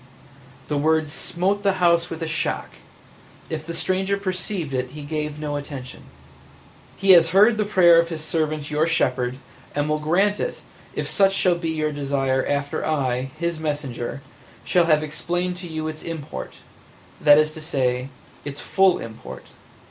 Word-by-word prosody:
The 145 -1 0
words 155 0 +2
smote 190 +6 -1
the 200 -1 +2
house 170 -2 +3
with 165 0 -5
a - - -2
shock; 160 - -2 0.8
if 155 -1 -3
the 170 +1 -6
stranger 190 +4 0
perceived 185 -5 -3
it 130 -1 -1
he 150 - -7
gave 150 0 -3
no 150 -1 -3
attention. 140 -3 -8 0.9
"He 195 0 +4
has 170 -2 +7
heard 215 +3 +7
the 215 -1 0
prayer 175 -4 +6
of 170 0 +1
His 160 -2 -5
servant 155 -2 -2
your 155 +2 +2
shepherd, 125 -6 0 0.4
and 145 +1 0
will 155 0 0
grant 190 +7 +2
it - - -3 0.3
if - - -2
such 195 -2 +3
shall 185 -2 +3
be 170 -1 -3
your 155 -1 -1
desire 135 -2 0
after 140 0 -1
I, 135 -4 0
His 170 0 -2
messenger, 140 -4 -4 0.4
shall 175 -2 +3
have 155 -2 +3
explained 175 +4 -2
to 180 -1 -7
you 155 -1 -4
its 155 0 -6
import 160 -3 -6 0.4
– - - -26
that 145 -1 +7
is 155 0 +3
to 155 - -10
say, 130 -4 -1 0.3
its 145 0 -6
full 190 -2 +3
import. 110 -1 -9
155 Hz, 170 wpm, -23 LUFS, 145-175 Hz, 0.9 s, has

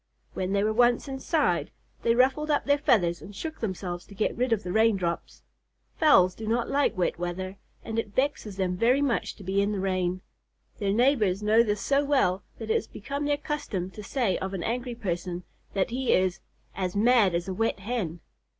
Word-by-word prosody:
When 185 0 -2
they 200 0 +2
were 215 +1 +1
once 240 +3 +3
inside, 275 +3 0 0.3
they 230 0 +2
ruffled 270 +5 +2
up 295 - +1
their 285 0 +3
feathers 175 - +2
and 200 - -11
shook 315 +8 -6
themselves 180 -4 -4
to 200 - -13
get 215 - 0
rid 250 +1 0
of 220 -2 +1
the 180 - -4
rain 220 +1 +4
drops. 170 -2 -4 0.5
Fowls 185 - +5
do 220 +2 -7
not 235 +1 +1
like 280 -7 +1
wet 175 -2 0
weather, 185 +2 -4 0.3
and 225 0 -2
it 210 -3 -5
vexes 260 -7 -1
them 185 -2 0
very 250 +8 +3
much 255 -5 -1
to 200 - -12
be 195 +2 +1
in 200 +1 +1
the 200 - -2
rain. 185 -1 -1 0.6
Their 200 -1 0
neighbors 215 -4 +2
know 215 +2 +5
this 210 -3 0
so 280 +5 +2
well 260 -10 +2 0.2
that 220 -1 -4
it - - +4
has - - 0
become 280 +7 -5
their 290 0 +1
custom 205 - -3
to 210 - -9
say 210 -2 0
of 190 +1 -4
an 175 - -4
angry 245 +3 -2
person 180 -4 -3 0.3
that 195 +3 +1
he 255 +1 +1
is 185 0 +2 0.3
"as 185 -1 -3
mad 215 -4 +4
as 170 +1 -2
a 190 - -2
wet 225 0 -1
Hen." 190 -7 -3
210 Hz, 205 wpm, -27 LUFS, 185-250 Hz, 0.6 s, Fowls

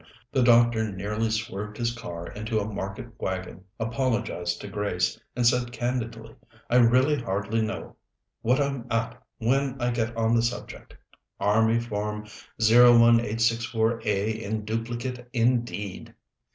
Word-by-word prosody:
The 130 - +2
doctor 120 -2 +4
nearly 105 +4 -2
swerved 105 -1 -4
his 120 0 -1
car 85 -7 -7
into 110 +3 -3
a 100 - -2
market 100 +2 -5
wagon, 95 0 -4
apologized 115 -7 -1
to - - -7
Grace, 100 -3 -1
and 120 -1 0
said 120 0 +3
candidly: 115 -2 -3 0.4
"I 125 - +5
really 130 +4 +4
hardly 105 +1 -1
know 110 - -4 0.4
what 125 +4 +2
I'm 140 -4 -1
at 115 +2 -2 0.2
when 135 +3 0
I 120 0 0
get 115 0 -2
on 115 0 +2
to 120 - +4
the - - +3
subject. 120 +1 -5 0.4
Army 110 +3 +3
Form 105 -2 -3 0.4
01864A 115 -2 +4
in 110 0 -3
duplicate 120 +3 -4
indeed! 120 -5 -1
115 Hz, 130 wpm, -26 LUFS, 105-120 Hz, 0.4 s, I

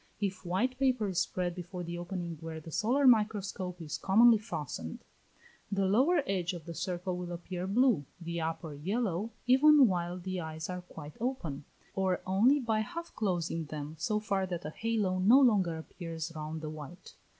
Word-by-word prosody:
If 195 -2 -2
white 235 +9 0
paper 255 -6 +2
is 185 -2 0
spread 180 -1 -1
before 180 0 -6
the 170 0 -5
opening 175 -1 -4
where 160 -1 -6
the 160 +1 -10
solar 250 - +2
microscope 205 -6 +2
is 155 -3 -5
commonly 225 +3 +6
fastened, 145 - -5 0.7
the 195 -1 +1
lower 265 - +4
edge 185 -4 -1
of 170 -3 -8
the 170 - -6
circle 180 +2 -3
will 180 -1 -5
appear 180 +1 -5
blue, 220 - +3
the 170 -1 -4
upper 160 -1 -3
yellow, 195 +5 -1 0.2
even 275 +3 +7
while 175 -2 -1
the 185 0 -4
eyes 160 +1 -5
are 180 0 -4
quite 155 -4 -11
open, 180 - -3 0.3
or 190 -2 +1
only 225 +10 +4
by 225 -4 0
half 335 +10 -5
closing 170 -5 -1
them 150 +1 -6
so 210 +5 0
far 195 -3 -1
that 175 -1 -4
a 150 - -4
halo 210 -3 0
no 220 +9 +7
longer 200 -11 +3
appears 165 0 -6
round 155 +1 -5
the 155 - -4
white. 155 +3 -10
185 Hz, 175 wpm, -31 LUFS, 165-215 Hz, 0.7 s, even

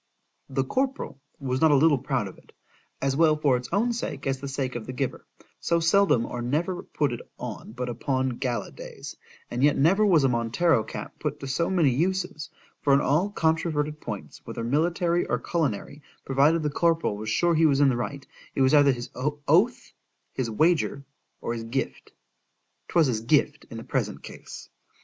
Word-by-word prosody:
The 135 0 0
corporal 260 - -2 0.2
was 130 -2 -2
not 160 - +6
a 145 - +5
little 145 0 +4
proud - - -1
of - - -10
it, - - -23 0.5
as 135 0 +1
well 155 0 +4
for 145 -4 +2
its 125 0 -4
own 230 +6 +1
sake, 145 - -4
as 135 -1 -1
the 140 - -6
sake 135 -1 -3
of 120 -2 -6
the 130 - -5
giver, 130 0 -3 0.3
so 170 - +1
seldom 165 -7 +3
or 120 - -5
never 160 +9 -1
put 145 -5 -1
it 120 - -5 0.2
on 110 - -7
but 125 +1 -4
upon 130 +2 -1
GALA 120 -5 -2
days; - - -9 0.4
and 120 +2 -1
yet 145 0 +4
never 185 +9 +4
was 175 -8 +4
a - - +5
Montero 120 +3 +2
cap - - -8
put - - -3
to 135 - -5
so 150 +6 0
many 170 -8 +3
uses; 175 +2 -1 0.3
for 140 -1 +4
in - - +4
all 155 +8 +2
controverted 160 -4 0
points, 105 -4 -7
whether 115 - -6
military 170 +6 +1
or - - +1
culinary, 145 -3 -2 0.2
provided 145 +5 +3
the 150 - 0
corporal 165 -7 +1
was 110 +1 -5
sure 170 +9 +2
he 160 0 +4
was 140 -2 +2
in 145 -1 +5
the 125 - +1
right,—it 135 +2 -6
was 130 +2 +4
either 145 -2 +6
his 120 -1 -5
oath,—his 145 - -1
wager,—or 140 -2 -1
his 115 -1 -5
gift. 130 +4 -4 0.8
——'Twas 165 -2 +3
his 115 -5 0
gift 115 - +1
in - - -8
the - - -7
present - - -2
case. - - -10
145 Hz, 185 wpm, -26 LUFS, 130-165 Hz, 0.8 s, not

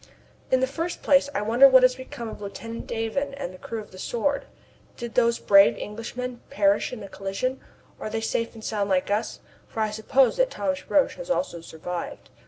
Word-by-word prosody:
In 260 0 +3
the - - +4
first 330 +6 -4
place 280 0 +4
I - - 0
wonder 235 +6 +7
what 260 -1 +7
has 255 0 +6
become 250 -2 -8
of 220 - -8
Lieutenant 230 +3 -7
Davon 275 +5 -2
and 230 -10 -5
the 185 - -13
crew 225 - -5
of 210 - -10
the 185 - -12
Sword. 280 +7 -1 0.5
Did 235 -1 -6
those 235 -1 +3
brave 200 -1 +6
Englishmen 240 +3 -6
perish 200 0 +2
in 250 - -7
the 200 - -7
collision? 195 +8 -3 0.4
Are - - -4
they 225 +1 -2
safe 230 +1 -2
and 220 - -11
sound 205 -2 -1
like 190 +1 +1
us 210 +2 -1 0.3
for - - -7
I 215 -1 +1
suppose 235 +4 +2
that - - +3
Thomas 190 - -3
Roch 290 - +4
has - - -8
also 275 - -1
survived? 170 +2 -7
230 Hz, 200 wpm, -25 LUFS, 205-260 Hz, 0.5 s, wonder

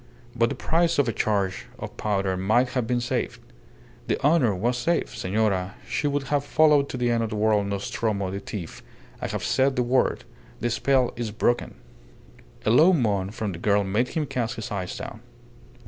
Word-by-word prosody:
But 115 0 +3
the 140 - -3
price 165 +5 +1
of 145 - +3
a 115 - 0
charge 100 -3 -1
of - - -7
powder 95 -3 0
might 110 +7 +2
have 125 -2 -1
been 125 0 +1
saved. 125 +1 -2 0.7
The - - 0
honour 140 - +4
was 120 +7 0
safe.... 165 +8 -1
Senora, 95 -1 0
she 135 +4 -1
would 145 0 0
have 140 +2 0
followed 150 -1 +4
to - - -4
the 120 -1 +1
end 115 -1 +1
of 110 - -2
the 110 - -4
world 105 -1 +2
Nostromo 100 -1 -2
the 100 - -3
thief.... 100 -4 -7 0.4
I - - -2
have - - -4
said 135 0 +2
the 125 - +2
word. 125 +2 +1 0.4
The 120 - -1
spell 130 +1 +2
is 120 -2 -3
broken!" 120 +3 0 0.9
A 110 - +3
low 160 +10 +6
moan 105 - +1
from 105 0 -4
the 85 - -7
girl 100 +2 +2
made 105 +6 0
him 155 +3 -2
cast 120 -3 -2
his 110 - -6
eyes 95 -3 -3
down. - - -7
115 Hz, 195 wpm, -25 LUFS, 100-130 Hz, 0.9 s, low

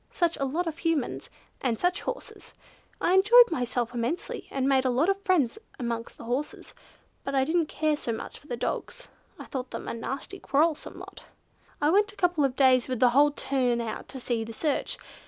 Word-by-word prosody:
Such 340 -1 +1
a 275 - -1
lot 320 +7 -1
of 330 -1 -4
Humans! 330 -6 -1 0.3
And 240 -4 0
such 355 +5 0
horses. - - -7 0.4
I 350 - +2
enjoyed 430 +4 +7
myself 245 -4 -1
immensely, 245 +8 -3
and 270 -1 -1
made 265 -1 +4
a 260 - +1
lot 265 +9 +2
of 395 0 0
friends 370 - +1 0.2
amongst 235 -1 -4
the - - -10
horses, 250 +6 -4 0.5
but 275 - -3
I 265 - +4
didn't 320 +2 +1
care 310 -1 0
so 270 -5 -4
much 225 - -6
for 290 - -20
the 240 - -4
dogs; - - -4 0.3
I - - -9
thought 255 -2 -5
them - - -6
a - - -2
nasty 270 +11 -5
quarrelsome 305 +2 0
lot. - - -11 0.5
"I 295 +1 +3
went 410 +3 +3
a - - -19
couple 350 -6 +2
of 265 -2 +1
days 260 -3 +4
with 255 -3 -2
the 245 -1 +5
whole 285 +4 +6
turn 260 -4 0
out 230 -2 -4
to 265 - -7
see 235 -2 -1
the 225 +1 -8
search. 295 +5 -1
275 Hz, 205 wpm, -27 LUFS, 245-330 Hz, 0.5 s, enjoyed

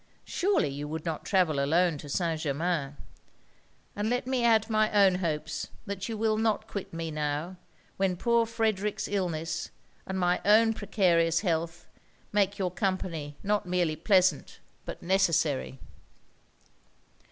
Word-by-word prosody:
Surely 385 - +1
you 145 +2 -5
would 160 +2 -5
not 160 -2 -3
travel 165 -8 +2
alone 170 +3 +2
to 145 - -9
St. 165 +1 -1
Germains. 150 -1 -1 1.0
And 210 +1 -1
let 245 +1 0
me 255 -1 0
add 225 -2 +4
my 215 -1 +2
own 200 -3 +5
hopes 155 -3 -3 0.2
that 195 0 -5
you 225 - -3
will 215 0 +1
not 220 -1 0
quit 200 -3 -6
me 165 -1 -4
now, 150 +4 -3 0.4
when 190 -2 +1
poor 235 +2 +2
Frederic's 215 -3 -1
illness, 165 -5 -2 0.4
and 190 - -3
my 180 -1 +1
own 225 +3 +5
precarious 170 -6 +2
health, 170 -3 -2 0.5
make 205 -1 +1
your 185 -3 -1
company 175 -6 -3
not 205 -1 0
merely 175 -3 +1
pleasant 180 -2 +2 0.3
but - - -7
necessary.' 165 -8 +1
180 Hz, 140 wpm, -28 LUFS, 160-210 Hz, 1.0 s, own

